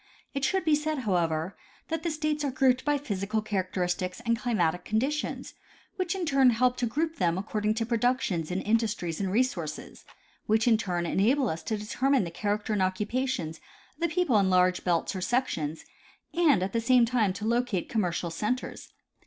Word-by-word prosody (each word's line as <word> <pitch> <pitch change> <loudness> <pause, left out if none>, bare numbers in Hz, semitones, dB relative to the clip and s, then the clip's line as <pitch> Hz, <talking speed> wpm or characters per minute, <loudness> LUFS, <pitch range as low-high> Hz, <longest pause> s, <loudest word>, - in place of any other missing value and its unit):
It 275 -1 -3
should 380 -1 +1
be 315 - +3
said, 305 +1 0
however, 170 -2 0 0.3
that 325 -1 -2
the 340 - -1
states 305 -1 -1
are 285 - 0
grouped 260 -1 +2
by 295 -1 +2
physical 210 -5 -2
characteristics 185 -3 -2
and 230 0 +3
climatic 180 -8 0
conditions, 270 +8 -2 0.4
which 370 -1 -1
in 370 -2 -2
turn 275 -4 +5
help 245 +2 +2
to 245 - 0
group 320 +7 -2
them 175 -2 +1
according 210 +2 -1
to 225 0 -1
productions 230 -8 0
and 180 +1 -2
industries 215 -7 0
and 190 -2 -1
resources, 190 -10 -2 0.4
which 220 +2 +2
in 230 - +6
turn 180 -5 -2
enable 235 - +2
us 160 +1 -3
to 215 +6 -2
determine 255 +5 +1
the 170 - -5
character 210 +4 -2
and 205 - +1
occupations 190 -2 -1 0.4
of - - -35
the 340 - +3
people 315 - +2
in 195 -1 +2
large 180 0 +3
belts 175 +2 0
or 185 - -3
sections, 170 - -1 0.5
and 305 - +4
at 190 - -3
the 230 - +1
same 245 +1 +5
time 230 -4 +1
to 205 +3 -6
locate 235 -5 0
commercial 175 -5 -1
centers. 215 +9 -3
220 Hz, 180 wpm, -28 LUFS, 185-260 Hz, 0.5 s, in